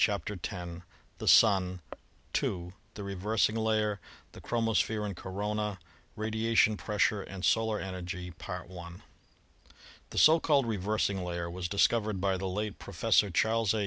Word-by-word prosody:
CHAPTER 105 0 0
X 90 -3 -5 0.4
THE - - -5
SUN 95 -4 +5 0.3
— - - -5
II: 90 -1 -3 0.2
THE 105 - -6
REVERSING 100 +3 0
LAYER; 110 -2 +1 0.3
THE - - -12
CHROMOSPHERE 110 -2 0
AND 100 -2 -4
CORONA; 105 +2 -3 0.4
RADIATION 110 0 +2
PRESSURE 105 0 +1
AND 95 -1 -5
SOLAR 110 -1 +2
ENERGY 90 -1 -5 1.8
The - - -8
so 160 +2 +7
called 145 -5 +3
"reversing 100 -2 -1
layer" 85 -1 -3
was 90 0 -4
discovered 105 0 +2
by 95 0 +1
the 95 +1 -3
late 105 +2 -3
Professor 105 - +2
Charles 110 +3 +2
A. - - 0
105 Hz, 135 wpm, -30 LUFS, 95-110 Hz, 1.8 s, so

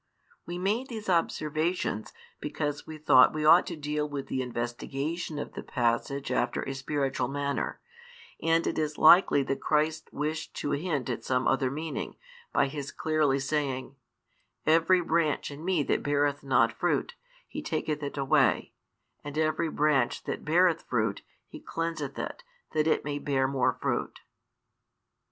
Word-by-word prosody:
We 175 - -4
made 210 +8 -1
these 220 -4 -6
observations 160 - 0 0.3
because 145 -1 -3
we 155 - -7
thought 130 -4 +6
we 155 0 -1
ought 165 +3 +7
to 170 - -4
deal 150 0 -2
with 140 -2 -5
the 130 - -1
investigation 135 +7 -3
of 145 - -5
the - - -6
passage 120 +3 -1
after - - 0
a 135 - -4
spiritual 135 -1 -1
manner, 140 +1 -2 0.6
and 165 0 +2
it - - -1
is 155 -1 -2
likely 160 -3 +7
that 135 0 -3
Christ 155 +1 0
wished 155 +2 -3
to 145 - -2
hint 145 -3 -1
at - - -4
some 130 0 0
other 135 -1 +2
meaning, 155 +4 -4 0.4
by - - +3
His 140 0 -5
clearly 155 -3 +1
saying: 135 -2 -2 0.7
Every 165 +3 +4
branch 165 -3 0
in 145 +2 -9
Me 180 -4 +1
that - - 0
beareth 145 0 +1
not 125 -4 +3
fruit, 175 - 0 0.3
He - - -6
taketh 150 -1 -2
it 145 0 -5
away; 135 -1 +2 0.5
and 145 +1 -6
every 155 +1 +1
branch 150 -2 +1
that - - -4
beareth 170 +1 +3
fruit, 110 -4 -1 0.3
He - - -10
cleanseth 165 -4 -4
it, - - -5 0.3
that 155 0 +1
it 160 - +1
may 145 0 -2
bear 135 -2 +1
more 130 -2 +1
fruit. - - -2
150 Hz, 155 wpm, -28 LUFS, 135-160 Hz, 0.7 s, ought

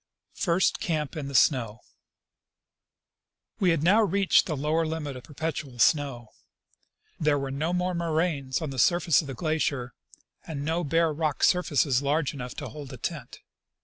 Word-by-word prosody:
First 175 -1 +1
Camp 155 -3 -2
in 150 -3 -4
the 140 - -6
Snow. 120 -4 +2 1.8
We 185 - +3
had 165 -3 +1
now 200 +7 +5
reached 200 -2 +3
the 155 - -2
lower 155 +4 +1
limit 155 -3 -4
of 125 - -8
perpetual 150 -3 -5
snow. 125 -3 +1 0.9
There 150 -2 +2
were 135 -1 -3
no 155 +5 -1
more 180 +1 0
moraines 160 -5 -1
on 150 - -3
the 130 - -5
surface 170 +5 +4
of 150 - -9
the 135 - -6
glacier, 140 -5 -1 0.5
and 145 -3 -5
no 165 +3 0
bare 165 +1 +2
rock 155 -2 -2
surfaces 145 -7 +3
large 145 +1 0
enough 125 -3 -7
to - - -6
hold 145 -3 -9
a - - -8
tent. 150 -9 -6
150 Hz, 160 wpm, -27 LUFS, 140-165 Hz, 1.8 s, now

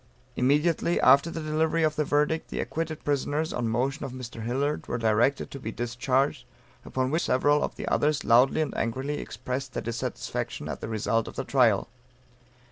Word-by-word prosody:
Immediately 150 +6 +2
after 140 +5 +6
the 165 -1 -5
delivery 160 +1 +1
of 155 -1 +2
the 155 - +1
verdict, 150 +2 0
the - - -4
acquitted 160 -1 -3
prisoners, 145 +2 0
on 120 -1 -1
motion 135 +7 -1
of 135 -2 -5
Mr. 125 -3 -7
Hillard, 135 +6 -1
were - - -2
directed 115 +4 +1
to 140 - -7
be 110 -3 -5
discharged, 125 +3 0 0.4
upon 130 0 -2
which 160 +3 +1
several 145 +3 +3
of - - -3
the - - -6
others 150 0 +1
loudly 125 +6 +5
and 155 - -2
angrily 130 +6 -2
expressed 130 +1 -5
their - - -3
dissatisfaction 120 0 -4
at - - -5
the - - -5
result 115 +1 0
of - - -8
the - - -2
trial. 120 -7 +3
135 Hz, 180 wpm, -27 LUFS, 120-150 Hz, 0.4 s, after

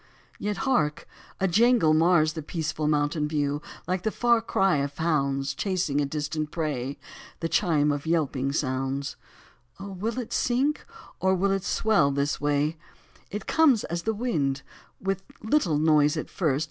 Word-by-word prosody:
Yet, 205 -1 -2
hark 160 - +1 0.3
1 195 - +1
a 175 - -5
jangle 230 -7 +5
mars 155 -1 +4
The 160 - -5
peaceful 155 -1 -3
mountain 150 0 +1
view, 145 -1 -1
6i - - -14
Like 185 0 -1
the 220 - 0
far 235 +1 +2
cry 195 -6 +2
of 140 +1 -3
hounds 140 -4 0
Chasing 170 -4 0
a 140 - 0
distant 150 +1 -3
prey: 140 -5 -3 0.4
The 165 - -1
chime 150 -2 +2
of 145 +2 -3
yelping 140 -5 0
sounds 135 -1 -2 0.3
— 120 0 -33
Oh, 195 +1 -7
will 215 +6 -3
it 245 -3 -4
sink, 265 +5 0 0.3
or 190 0 +2
will 195 +2 +1
it 195 -1 0
swell 195 -7 +2
this 140 +1 -1
way? 145 +2 +1 0.5
It 210 +2 -5
comes 285 -9 +4
as 170 +1 -3
comes - - -9
the 220 0 0
wind. 150 - -1 0.4
With 195 0 -2 0.2
little 220 - +2
noise 150 0 +3
at 155 - -5
first. 150 -7 0
155 Hz, 170 wpm, -26 LUFS, 145-195 Hz, 0.5 s, jangle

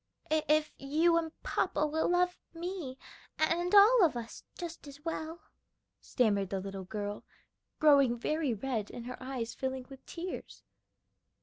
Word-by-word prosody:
"If 310 0 +2
you 315 +5 +3
and 325 -1 -1
papa 300 - +1
will 315 +1 0
love 360 0 +2 0.2
me 335 -6 -5 0.4
and 345 +4 +2
all 420 +2 +8
of 310 -8 +3
us 230 -1 -7
just 340 -4 -7
as 285 +2 -12
well," 325 0 -4 0.6
stammered 205 -6 +1
the 195 - -1
little 195 0 -6
girl, 205 +1 -4 0.5
growing 280 -5 +5
very 305 +3 0
red, 220 -2 -2
and 235 - -8
her 250 0 -6
eyes 255 -3 -4
filling 260 -1 -3
with 270 -1 -12
tears. 355 +2 -7
290 Hz, 140 wpm, -32 LUFS, 240-335 Hz, 0.6 s, all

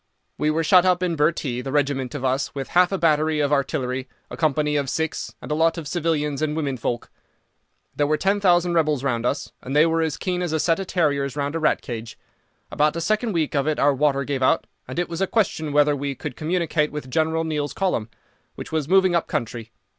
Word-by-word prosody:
"We 150 - +2
were 160 +2 +1
shut 180 +2 +6
up 185 -1 +2
in 175 -2 0
Bhurtee, 150 -5 0
the 135 - -5
regiment 140 -2 0
of 135 -2 -3
us 130 +3 -1
with 135 -1 -4
half 180 +1 +4
a 195 - 0
battery 155 -2 +2
of 145 0 +1
artillery, 130 -2 -1 0.2
a - - -5
company 150 -1 +1
of 140 -2 0
Sikhs, 160 +3 -3
and - - -7
a - - +2
lot 165 +2 +2
of 160 -3 -5
civilians 150 -3 -1
and 155 -1 0
women 145 -4 -1
folk. 120 -1 -4 0.8
There 145 - +1
were 155 +1 +2
ten 195 +4 +1
thousand 175 -3 +3
rebels 155 -5 +1
round 120 -3 0
us, 140 +2 -2
and 135 +3 -5
they 150 +2 +6
were 165 0 +1
as 160 -3 -1
keen 180 -2 -2
as 175 -3 -2
a 160 - +1
set 165 +3 +2
of 195 - -4
terriers 145 -7 0
round 145 0 -2
a 165 - -1
rat 155 -1 +1
cage. 115 -2 -6 0.5
About 150 +1 +2
the 170 - -3
second 215 +6 0
week 160 -3 0
of 140 0 0
it 155 - +1
our 145 0 +4
water 140 0 +1
gave 140 -1 -3
out, 130 - +3 0.2
and 130 - -7
it 175 - 0
was 170 +2 -5
a 195 - +2
question 170 -9 0
whether 145 0 +4
we 140 0 -3
could 145 -1 -6
communicate 160 -2 0
with 150 -4 -7
General 160 +2 +1
Neill's 150 -2 -2
column, 180 - -1 0.5
which - - -8
was 155 -2 -1
moving 190 -1 +4
up 170 - +1
country. 115 -1 -4
150 Hz, 230 wpm, -23 LUFS, 140-165 Hz, 0.8 s, shut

